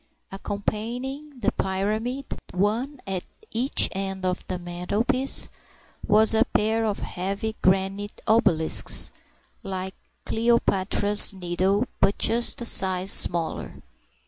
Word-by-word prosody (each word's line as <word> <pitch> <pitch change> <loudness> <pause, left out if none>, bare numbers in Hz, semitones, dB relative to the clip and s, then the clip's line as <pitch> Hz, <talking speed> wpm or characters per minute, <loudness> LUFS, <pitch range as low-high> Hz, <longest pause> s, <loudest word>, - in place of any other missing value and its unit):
Accompanying 240 +8 -6
the - - 0
pyramid—one 215 +4 -4
at 190 -2 -4 0.3
each 250 +5 +3
end 195 -1 -5
of 180 0 -3
the 185 - -4
mantelpiece—was 215 +3 0
a 225 +1 +3
pair 225 -1 -1
of 210 -2 -3
heavy 200 +4 -5
granite 195 +2 -1
obelisks 175 -8 +4 0.5
(like 190 -2 -6 0.3
Cleopatra's 210 -3 +3
Needle, 185 +4 -1
but 200 - +1
just 235 +2 +2
a - - -4
size 190 -3 +3
smaller). 170 -2 +1
205 Hz, 95 wpm, -23 LUFS, 190-230 Hz, 0.5 s, obelisks